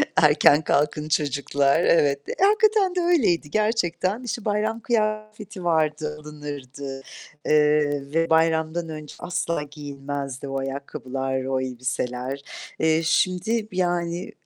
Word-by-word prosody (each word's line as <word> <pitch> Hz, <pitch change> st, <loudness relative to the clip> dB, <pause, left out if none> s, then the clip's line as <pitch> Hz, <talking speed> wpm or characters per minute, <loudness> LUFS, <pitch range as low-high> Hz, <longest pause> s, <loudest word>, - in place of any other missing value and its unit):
"Erken 150 Hz, -1 st, +5 dB
kalkın 150 Hz, +1 st, 0 dB
çocuklar." 140 Hz, 0 st, +1 dB
Evet. 145 Hz, -5 st, +3 dB, 0.2 s
Hakikaten 415 Hz, -2 st, +4 dB
de -, -, +1 dB
öyleydi 240 Hz, -, +2 dB
gerçekten. 215 Hz, 0 st, 0 dB
İşte, 235 Hz, -2 st, -4 dB
bayram 215 Hz, +2 st, 0 dB
kıyafeti 215 Hz, -3 st, -2 dB
vardı, 155 Hz, -2 st, 0 dB
alınırdı, 140 Hz, -3 st, -7 dB, 0.5 s
ııı, 150 Hz, -2 st, +2 dB
ve 165 Hz, +1 st, +1 dB
bayramdan 160 Hz, +1 st, +2 dB
önce 155 Hz, -2 st, -8 dB
asla 175 Hz, -3 st, -2 dB
giyinmezdi 140 Hz, -2 st, -6 dB
o 135 Hz, 0 st, -2 dB
ayakkabılar, 135 Hz, -1 st, -4 dB
o 130 Hz, 0 st, 0 dB
elbiseler. 130 Hz, +1 st, -3 dB, 0.4 s
Eee, 160 Hz, 0 st, +3 dB
şimdi, 185 Hz, +7 st, +1 dB
yani 175 Hz, -1 st, -1 dB
155 Hz, 110 wpm, -24 LUFS, 140-185 Hz, 0.5 s, Erken